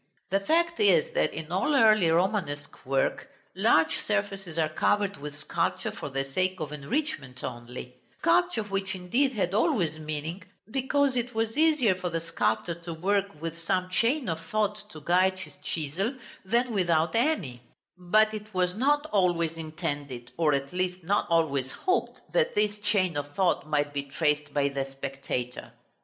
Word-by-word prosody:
The 195 - +3
fact 335 +10 +1
is, 470 +3 +4
that - - +2
in - - -7
all 300 - +1
early 215 -8 +6
Romanesque 165 -6 -1
work, 135 0 0 0.3
large 165 -5 +4
surfaces 195 -5 -2
are 160 -1 +3
covered 200 +5 +1
with 145 0 -7
sculpture 150 - -1
for 145 - -6
the 135 0 -1
sake 185 +7 -1
of 155 -2 -4
enrichment 140 - -3
only; 125 +1 -7 0.2
sculpture 345 -7 +2
which 195 -1 -2
indeed 240 +10 +1
had 190 -4 -1
always 200 - +1
meaning, 155 +4 -4 0.3
because 270 +1 +1
it 245 -1 -2
was 225 0 0
easier 300 -9 +4
for 185 -1 -4
the 165 0 -1
sculptor 165 -2 -1
to 170 0 -7
work 195 0 0
with 165 0 -4
some 185 +2 -1
chain 245 +7 +1
of 165 -3 -1
thought 210 -1 0
to 155 -5 -10
guide 185 +4 +3
his 155 -6 -9
chisel, 170 - -3 0.3
than 235 +4 +1
without 170 -4 +2
any; 210 - 0 0.3
but 215 +5 +3
it 215 0 -7
was 180 -1 +2
not 290 +6 +2
always 175 -5 +2
intended, 145 -6 -5
or 155 -3 +3
at 140 +3 -3
least 180 0 -1
not 200 +5 +1
always 140 -6 +1
hoped, 370 +1 -1
that - - +2
this 210 0 +1
chain 200 -5 +1
of 145 0 -4
thought 185 -5 +1
might 145 -1 0
be 140 - -1
traced 150 +1 -1
by 140 -1 +2
the 140 -1 -1
spectator. 135 -2 -5
180 Hz, 165 wpm, -28 LUFS, 150-215 Hz, 0.3 s, early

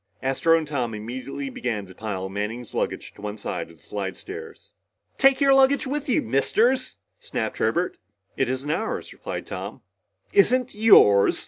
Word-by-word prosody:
Astro 150 +5 +3
and 160 -2 -3
Tom 125 -6 -2
immediately 130 +5 -5
began 115 -5 -3
to 95 - -13
pile 95 -2 -4
Manning's 105 +4 -5
luggage - - -3
to - - -15
one 105 +1 -5
side 90 -5 -4
of 85 - -16
the - - -21
slidestairs. 385 - -7 0.5
"Take 270 0 +5
your 275 -1 +5
luggage 270 +1 +4
with 290 +2 -3
you, 250 - +2
Misters!" 230 - +1 0.2
snapped - - -4
Herbert. - - 0 0.4
"It 135 - 0
isn't 130 +3 -2
ours," 220 +8 -3
replied - - -6
Tom. - - -7 0.5
"Isn't 255 - +3
yours?" 200 - +6
135 Hz, 155 wpm, -24 LUFS, -, 0.5 s, yours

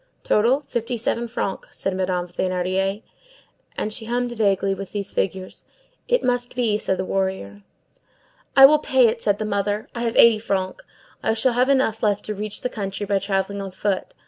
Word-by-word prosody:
"Total, 240 +7 +3
fifty 240 -3 -3
seven 235 +1 -1
francs," 200 -4 -5
said 195 - -2
Madame 185 -1 -1
Thénardier. 185 +3 -1 0.7
And 215 - -2
she 225 - -6
hummed 245 +1 -1
vaguely, 200 -4 +1
with 195 -1 -8
these 205 -1 -3
figures:— 190 -1 -3 0.4
"It - - +2
must 245 -1 -1
be, 225 -4 +1
said 190 - -1
a 185 - -1
warrior." 190 - -2 0.9
"I 270 - +10
will 300 +2 +6
pay 265 -4 +3
it," 230 +1 -1
said 205 -1 +1
the 215 - -3
mother. 205 +1 -1
"I 235 - -5
have 230 -1 -1
eighty 230 -2 +7
francs. 190 -3 -2 0.4
I 220 - +1
shall 240 +3 +2
have 250 +2 +2
enough 260 -5 +2
left 205 -2 0
to 215 - -3
reach 210 +1 -4
the - - -1
country, 200 -2 -4
by 200 0 +1
travelling 195 0 -2
on 195 - -5
foot. 190 +1 -3
210 Hz, 185 wpm, -22 LUFS, 195-235 Hz, 0.9 s, I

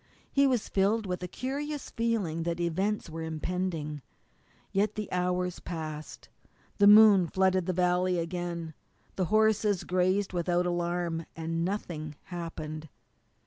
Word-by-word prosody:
He 280 0 +4
was 250 -5 +1
filled 205 +3 +1
with 180 -1 -3
a 180 - -3
curious 280 - -4
feeling 220 -9 -1
that 170 +1 -2
events 190 +5 -1
were 165 0 -6
impending. 160 -2 -3 0.7
Yet 205 +2 +1
the 210 -2 -3
hours 180 0 -1
passed, 155 -3 -6 0.5
the 205 - +7
moon 205 -3 +8
flooded 185 0 +2
the 185 - +1
valley 180 0 +2
again, 170 -1 -3 0.4
the 185 - 0
horses 215 -1 +2
grazed 185 +2 +1
without 175 0 +1
alarm, 175 -1 -1
and 165 +1 -2
nothing 170 -5 -4
happened. 160 -3 -6
180 Hz, 130 wpm, -29 LUFS, 165-200 Hz, 0.7 s, moon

